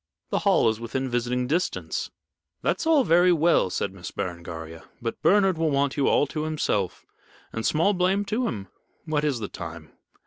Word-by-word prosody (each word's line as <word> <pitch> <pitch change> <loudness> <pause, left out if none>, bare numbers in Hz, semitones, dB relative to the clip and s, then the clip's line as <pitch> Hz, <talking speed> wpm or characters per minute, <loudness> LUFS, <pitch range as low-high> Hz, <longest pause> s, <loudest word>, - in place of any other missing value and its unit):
The - - +1
Hall - - +3
is 110 -1 +1
within 130 +3 -3
visiting 125 +1 0
distance." 170 +8 -1 0.5
"That's - - 0
all 310 -4 +5
very 175 -2 +5
well," 170 - +3
said 90 - -2
Miss 95 -2 -8
Berengaria. 85 -2 -6
"But 115 -2 -4
Bernard 195 -4 +4
will 165 -1 +2
want 140 -1 +1
you 140 -3 +1
all - - +4
to 150 +2 -4
himself, 150 - -1 0.5
and 115 - -3
small 165 - +3
blame 190 +2 +1
to 225 +5 0
him. 100 -4 -4 0.4
What 155 -2 0
is 145 -4 +1
the 110 -3 -4
time?" 85 -4 -8
140 Hz, 175 wpm, -25 LUFS, 105-170 Hz, 0.5 s, all